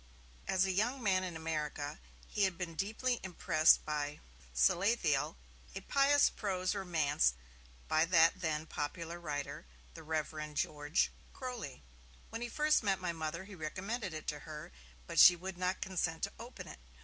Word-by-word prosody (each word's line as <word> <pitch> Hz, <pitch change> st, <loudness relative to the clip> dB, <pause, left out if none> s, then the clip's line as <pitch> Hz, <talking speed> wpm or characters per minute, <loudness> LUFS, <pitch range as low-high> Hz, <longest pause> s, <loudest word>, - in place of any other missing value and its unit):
As 190 Hz, 0 st, +3 dB
a 190 Hz, -, 0 dB
young 240 Hz, +7 st, 0 dB
man 190 Hz, -3 st, +3 dB
in 180 Hz, -2 st, -4 dB
America, 155 Hz, -2 st, -3 dB, 0.3 s
he 210 Hz, -, -3 dB
had 185 Hz, -3 st, -1 dB
been 175 Hz, -2 st, -4 dB
deeply 220 Hz, +7 st, -1 dB
impressed 165 Hz, -3 st, +4 dB
by 150 Hz, -1 st, -2 dB, 0.3 s
'Salathiel', 160 Hz, -, +2 dB, 0.4 s
a -, -, -4 dB
pious 280 Hz, +1 st, +4 dB
prose 185 Hz, -3 st, -1 dB
romance 160 Hz, -, +1 dB, 0.5 s
by 155 Hz, +1 st, +3 dB
that 170 Hz, +1 st, +4 dB
then 155 Hz, -2 st, -1 dB
popular 165 Hz, +3 st, -4 dB
writer, 145 Hz, -1 st, -5 dB, 0.3 s
the 165 Hz, -, -10 dB
Rev. 155 Hz, -1 st, -3 dB
George 150 Hz, +2 st, 0 dB, 0.2 s
Croly. 240 Hz, -, -6 dB, 0.5 s
When 225 Hz, -, -5 dB
he 240 Hz, -, -3 dB
first 300 Hz, +5 st, +3 dB
met 195 Hz, -4 st, +1 dB
my 180 Hz, -2 st, -1 dB
Mother, 160 Hz, +2 st, -4 dB
he 200 Hz, +1 st, -11 dB
recommended 190 Hz, +6 st, -4 dB
it 155 Hz, 0 st, -6 dB
to 150 Hz, -, -4 dB
her, 150 Hz, -, -9 dB, 0.3 s
but -, -, -1 dB
she 180 Hz, -, +10 dB
would 180 Hz, +1 st, -7 dB
not 185 Hz, +1 st, -1 dB
consent 175 Hz, -3 st, -2 dB
to -, -, -1 dB
open 235 Hz, +2 st, -9 dB
it. -, -, -10 dB
170 Hz, 160 wpm, -34 LUFS, 155-195 Hz, 0.5 s, she